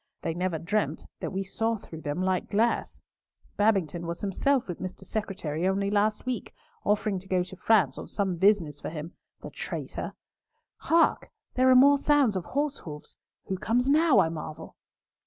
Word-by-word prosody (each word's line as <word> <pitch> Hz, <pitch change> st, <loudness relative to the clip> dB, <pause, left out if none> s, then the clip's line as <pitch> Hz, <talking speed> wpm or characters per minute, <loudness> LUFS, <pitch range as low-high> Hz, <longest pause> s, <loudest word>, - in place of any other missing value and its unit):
They 165 Hz, -, -1 dB
never 180 Hz, 0 st, -1 dB
dreamt 205 Hz, +7 st, -1 dB
that -, -, -4 dB
we 195 Hz, 0 st, -2 dB
saw 225 Hz, +4 st, -1 dB
through 160 Hz, -5 st, -10 dB
them 155 Hz, +4 st, -2 dB
like 185 Hz, -1 st, 0 dB
glass. 225 Hz, +3 st, 0 dB, 0.5 s
Babington 180 Hz, -6 st, +1 dB
was 170 Hz, 0 st, -5 dB
himself 250 Hz, +7 st, +1 dB
with 175 Hz, -, -5 dB
Mr. 185 Hz, 0 st, -6 dB
Secretary 185 Hz, -6 st, -2 dB
only 200 Hz, +1 st, 0 dB
last 210 Hz, +2 st, +1 dB
week, 250 Hz, -3 st, -4 dB, 0.3 s
offering 210 Hz, -1 st, +1 dB
to 190 Hz, -, -15 dB
go 185 Hz, -1 st, +1 dB
to 180 Hz, +1 st, -10 dB
France 195 Hz, -, +3 dB, 0.2 s
on 190 Hz, -4 st, 0 dB
business 170 Hz, -6 st, +2 dB
for -, -, -4 dB
him—the 160 Hz, +1 st, -10 dB
traitor! -, -, -5 dB, 0.6 s
Hark! 330 Hz, 0 st, +2 dB, 0.2 s
there 255 Hz, +1 st, +4 dB
are 255 Hz, -, +7 dB
more 280 Hz, +2 st, +7 dB
sounds 285 Hz, -8 st, +3 dB
of 185 Hz, -, -2 dB
horse 290 Hz, +1 st, -1 dB
hoofs. 150 Hz, -2 st, -9 dB, 0.3 s
Who 190 Hz, -, -3 dB
comes 245 Hz, +5 st, +1 dB
now, 310 Hz, -1 st, +5 dB
I 160 Hz, -, +3 dB
marvel!" 155 Hz, -1 st, -7 dB
195 Hz, 165 wpm, -28 LUFS, 175-225 Hz, 0.6 s, are